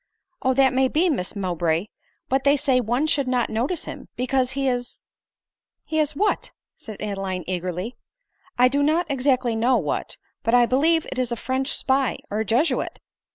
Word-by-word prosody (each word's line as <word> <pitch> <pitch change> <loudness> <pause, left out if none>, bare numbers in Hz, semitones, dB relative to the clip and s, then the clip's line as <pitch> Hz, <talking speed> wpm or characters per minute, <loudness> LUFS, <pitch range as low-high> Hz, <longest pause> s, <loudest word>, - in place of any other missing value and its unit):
" 360 -2 -51
Oh, 260 0 +2
that 265 -1 +4
may 260 0 +3
be, 330 +6 +2
Miss 200 -8 -3
Mowbray; 175 -3 0 0.4
but 265 +1 +1
they 285 +1 +4
say 265 -2 +2
one 245 +5 0
should 285 -4 +1
not 250 -2 0
notice 255 +10 -1
him, - - -8
because 255 0 0
he 275 0 -1
is 245 -1 -3 0.3
" - - -69
" - - -69 0.2
He 315 - -2
is 300 -1 0
what 415 +7 0
?" - - -68
said 215 -3 -9
Adeline 195 -3 -3
eagerly. 185 +5 -3 0.3
" - - -45
I 250 +1 +6
do 280 +3 +1
not 315 +4 +2
exactly 255 -3 +1
know 240 +3 +3
what; - - -3 0.2
but 230 +2 +2
I 245 -1 +6
believe 315 +7 +2
it 260 - -3
is 250 -2 0
a - - 0
French 260 +3 -2
spy 265 -1 +1
or 210 - -1
a 220 - 0
Jesuit." 245 - +1
255 Hz, 200 wpm, -23 LUFS, 225-275 Hz, 0.4 s, I